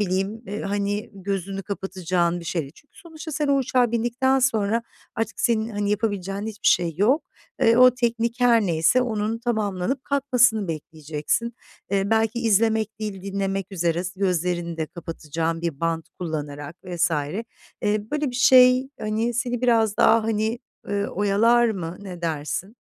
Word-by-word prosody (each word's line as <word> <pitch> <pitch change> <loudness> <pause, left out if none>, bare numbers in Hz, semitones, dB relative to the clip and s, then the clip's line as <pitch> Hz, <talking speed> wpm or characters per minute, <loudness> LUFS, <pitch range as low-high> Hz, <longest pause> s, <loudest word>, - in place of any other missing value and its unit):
bileyim, 195 +3 -1
eee, 205 +2 -5
hani, 205 +1 -2
gözünü 195 0 -4
kapatacağın 180 -3 -1
bir - - -10
şey 165 -1 -1
değil. 140 +2 -11
Çünkü 290 - -22
sonuçta 325 -3 -9
sen 295 0 -1
o 280 - +4
uçağa 250 -2 +1
bindikten 240 +3 +1
sonra 230 -3 +1 0.3
artık 225 - -3
senin 225 -2 +1
hani, 205 -1 -1
yapabileceğin 205 -1 -2
hiçbir 215 -1 -5
şey 170 -2 +2
yok. 245 - +3 0.4
Eee, 230 0 +5
o 255 0 +8
teknik 235 -1 -1
her 240 -2 +5
neyse 170 +7 +3
onun 220 -2 -2
tamamlanıp 220 +1 -2
kalkmasını 250 -7 +2
bekleyeceksin. 155 +7 -3 0.4
Eee, 200 +1 0
belki 225 +1 +1
izlemek 220 -1 +2
değil, 205 -3 -5
dinlemek 195 0 -3
üzere, 170 -1 0
s 185 +1 -7
gözlerini 175 -2 0
de 160 -1 -2
kapatacağın 165 -1 -4
bir 165 -5 -3
bant 165 -1 -1
kullanarak 150 -2 -5
vs. 175 -1 0 0.7
Eee, 210 0 -1
böyle 300 -2 -1
bir 245 - -6
şey, 255 +1 +6
hani, 220 +3 -1
seni 245 0 -1
biraz 225 -4 +3
daha, 225 0 +5
hani, 220 +1 0 0.3
ııı, 200 0 -1
oyalar 215 +5 +3
mı, 180 -5 -4
ne 180 -4 -9
dersin? 165 +7 -3
205 Hz, 155 wpm, -24 LUFS, 180-235 Hz, 0.7 s, o